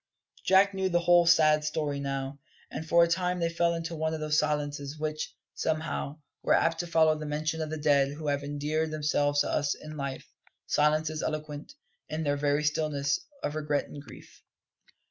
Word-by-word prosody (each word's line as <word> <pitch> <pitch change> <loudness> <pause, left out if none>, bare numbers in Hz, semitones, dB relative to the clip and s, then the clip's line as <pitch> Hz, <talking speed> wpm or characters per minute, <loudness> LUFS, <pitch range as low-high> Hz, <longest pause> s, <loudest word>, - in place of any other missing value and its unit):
Jack 195 +1 +5
knew 190 -1 0
the 175 -1 +2
whole 175 0 +5
sad 155 -2 +5
story 150 -2 -2
now, 135 0 -4 0.3
and 160 0 -6
for 170 0 +6
a - - +3
time 180 +1 0
they 170 -1 +1
fell 170 0 +2
into 165 0 -4
one 160 0 -1
of - - -5
those 155 0 +2
silences 145 -1 -2
which, 155 0 -4 0.2
somehow, 155 -2 -2 0.3
are - - +4
apt 165 0 +2
to 175 - -2
follow 160 -2 +4
the 155 0 -6
mention 155 +2 -2
of 155 - -3
the 155 - -3
dead 140 -2 +3
who 155 +1 -6
have 145 0 0
endeared 150 +2 -1
themselves 145 -1 +1
to - - -1
us 145 -1 +1
in 155 0 -10
life 140 -2 -5 0.4
silences 155 +1 +1
eloquent, 155 - -5 0.3
in 155 +1 -3
their 145 -1 +1
very 145 +1 +1
stillness, 150 -2 0 0.2
of 145 - -1
regret 150 -1 -1
and 145 - -8
grief. 140 - -14
155 Hz, 185 wpm, -29 LUFS, 145-160 Hz, 0.4 s, for